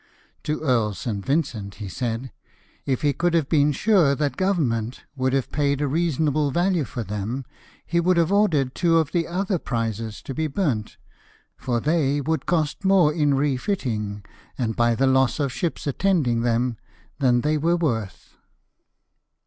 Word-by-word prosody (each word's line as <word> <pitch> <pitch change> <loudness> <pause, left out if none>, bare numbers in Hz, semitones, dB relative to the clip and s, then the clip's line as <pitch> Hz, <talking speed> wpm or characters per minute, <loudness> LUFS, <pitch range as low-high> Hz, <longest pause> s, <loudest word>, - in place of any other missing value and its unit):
To 150 +1 -2
Earl 115 -8 +1
St. 105 -5 -4
Vincent 125 -8 -1
he 105 - -7
said, 120 +5 -3 0.3
" - - -35
If 135 0 -1
he 145 -1 +3
could 175 +4 0
have 160 -5 +2
been 150 -2 +3
sure 170 -3 +3
that 145 -2 -1
Government 130 - -1
would 130 -1 0
have 135 -2 0
paid 140 -2 +1
a 145 - 0
reasonable 155 -1 +1
value 175 +1 +1
for 120 - -5
them, 105 +6 -4 0.4
he 170 - 0
would 180 +1 +2
have 170 +1 +2
ordered 160 -11 +2
two 170 -2 +2
of 160 -3 +1
the 170 -1 0
other 185 +1 -1
prizes 115 -4 -3
to 135 - -5
be 160 +3 -1
burnt, 135 - -2 0.6
for 120 -2 -2
they 145 0 +1
would 155 0 -2
cost 160 0 0
more 190 -6 +4
in 150 -3 +2
refitting, 125 - -2 0.3
and 115 -4 -1
by 120 0 +2
the 135 - +2
loss 130 -1 +2
of 140 -3 -1
ships 165 +7 -3
attending 145 -6 +1
them, 120 0 0 0.4
than 125 -3 +3
they 150 +3 +1
were 170 +3 +2
worth." 115 - -3
140 Hz, 165 wpm, -23 LUFS, 120-165 Hz, 0.6 s, more